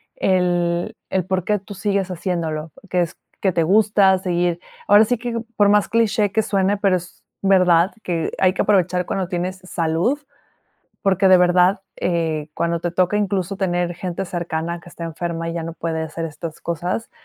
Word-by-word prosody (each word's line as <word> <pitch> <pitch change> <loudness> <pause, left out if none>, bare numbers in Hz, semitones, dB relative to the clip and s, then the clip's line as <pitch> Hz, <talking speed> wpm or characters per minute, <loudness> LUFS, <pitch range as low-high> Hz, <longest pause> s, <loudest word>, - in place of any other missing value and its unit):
el 175 +1 +1
el 190 -2 0
por 185 -1 -1
qué 210 -1 +1
tú 200 +2 -10
sigues 195 -1 -1
haciéndolo, 165 -3 -3 0.2
que 180 0 +1
es 170 - -3 0.2
que 190 - +2
te 170 -1 +1
gusta 200 +1 +4
seguir 175 -2 0 0.3
ahora 205 +1 +7
sí 245 +3 0
que 230 0 -3 0.2
por 205 -1 +5
más 205 -1 +4
cliché 220 -3 +2
que 220 - +2
suene, 200 -1 +1
pero 195 -2 +2
es 175 -1 -7 0.2
verdad 185 -2 +4
que 170 -5 -2
hay 185 -1 +4
que - - -1
aprovechar 180 -3 +2
cuando 190 0 -2
tienes 180 +1 -3
salud, 175 - 0 0.8
porque 195 -1 +3
de 185 -1 +7
verdad, 180 +2 +4 0.2
eh, 160 -3 -1
cuando 170 +1 -1
te 175 - -2
toca, 185 +3 +1
incluso, 195 -2 -1
tener 175 -2 -1
gente 180 +2 -4
cercana 170 -1 -3
que 175 - -15
está 170 - -7
enferma 165 0 -4
y 165 - -4
ya 170 - -3
no 165 +1 -5
puede 165 -1 -3
hacer 160 +1 -4
estas 160 +1 -8
cosas, 175 +6 -3
180 Hz, 180 wpm, -21 LUFS, 170-195 Hz, 0.8 s, ahora